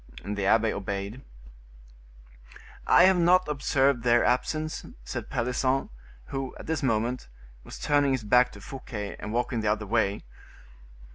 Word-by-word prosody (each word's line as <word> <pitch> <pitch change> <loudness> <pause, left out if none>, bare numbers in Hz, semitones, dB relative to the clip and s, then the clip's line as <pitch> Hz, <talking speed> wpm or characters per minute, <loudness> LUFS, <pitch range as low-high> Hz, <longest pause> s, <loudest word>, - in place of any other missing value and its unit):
The 100 -1 -2
abbe 110 +1 +3
obeyed. 100 +4 -5 1.7
"I - - +7
have 185 -1 +5
not 180 +1 +4
observed 140 -3 +1
their 120 0 +3
absence," 155 +5 -1 0.2
said - - -6
Pelisson, 130 - 0 0.4
who, 135 -1 -4
at - - -10
this 160 0 -2
moment, 120 - -1 0.3
was - - -10
turning 145 -2 +2
his 130 -3 -2
back 125 +4 +4
to 100 - -12
Fouquet, 105 -4 -7
and 105 - -6
walking 120 0 -1
the 105 -1 +1
other 105 0 -2
way. 105 -1 0
125 Hz, 140 wpm, -27 LUFS, 105-135 Hz, 1.7 s, I